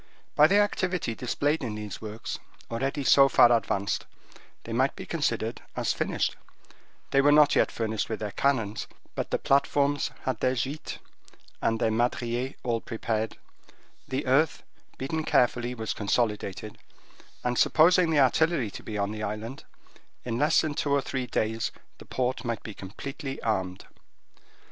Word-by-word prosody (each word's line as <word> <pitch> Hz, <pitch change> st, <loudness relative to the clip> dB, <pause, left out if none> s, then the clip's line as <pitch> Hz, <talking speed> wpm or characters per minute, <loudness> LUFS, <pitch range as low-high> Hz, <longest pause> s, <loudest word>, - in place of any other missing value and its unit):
By 150 Hz, -, +7 dB
the 200 Hz, -, +4 dB
activity 185 Hz, -, +1 dB
displayed 145 Hz, +6 st, -1 dB
in 110 Hz, -4 st, -3 dB
these 105 Hz, -1 st, -6 dB
works, 110 Hz, 0 st, -6 dB, 0.3 s
already 135 Hz, +4 st, -1 dB
so 135 Hz, +1 st, +6 dB
far 120 Hz, -1 st, +6 dB
advanced, 100 Hz, -3 st, -1 dB, 0.6 s
they -, -, -6 dB
might -, -, +2 dB
be -, -, -7 dB
considered -, -, -1 dB
as -, -, 0 dB
finished: -, -, -1 dB, 0.8 s
they 135 Hz, -, +5 dB
were 145 Hz, +1 st, +5 dB
not 150 Hz, -1 st, +6 dB
yet -, -, +3 dB
furnished 110 Hz, -2 st, -2 dB
with 110 Hz, -, -3 dB
their 105 Hz, -2 st, -3 dB
cannons, 115 Hz, -6 st, 0 dB, 0.3 s
but -, -, -3 dB
the -, -, +1 dB
platforms 140 Hz, +1 st, +2 dB
had 130 Hz, -4 st, -2 dB
their 130 Hz, 0 st, +1 dB
gites 135 Hz, +5 st, -3 dB, 0.6 s
and 115 Hz, 0 st, +1 dB
their 110 Hz, -, +2 dB
madriers 120 Hz, +2 st, -1 dB
all 115 Hz, -2 st, 0 dB
prepared; 110 Hz, -1 st, -3 dB, 0.7 s
the 135 Hz, +2 st, -2 dB
earth, 140 Hz, +5 st, +2 dB, 0.3 s
beaten 155 Hz, +4 st, -2 dB
carefully, 125 Hz, -2 st, +2 dB
was 110 Hz, -2 st, -3 dB
consolidated; 105 Hz, -1 st, -1 dB, 0.6 s
and 125 Hz, 0 st, 0 dB
supposing 175 Hz, +2 st, +5 dB
the 155 Hz, -2 st, +3 dB
artillery 135 Hz, -3 st, +2 dB
to -, -, -8 dB
be 105 Hz, -, -5 dB
on 100 Hz, 0 st, 0 dB
the 110 Hz, 0 st, -5 dB
island, 110 Hz, +5 st, -5 dB, 0.6 s
in 120 Hz, -1 st, -2 dB
less 150 Hz, +2 st, +4 dB
than 155 Hz, -2 st, -2 dB
two 145 Hz, -, -2 dB
or 140 Hz, 0 st, +3 dB
three 130 Hz, -1 st, -3 dB
days 110 Hz, 0 st, -1 dB, 0.3 s
the -, -, -12 dB
port 130 Hz, 0 st, -1 dB
might 115 Hz, -3 st, -3 dB
be 110 Hz, -, -7 dB
completely 135 Hz, +8 st, -7 dB
armed. 95 Hz, -5 st, -1 dB
125 Hz, 155 wpm, -27 LUFS, 110-140 Hz, 0.8 s, By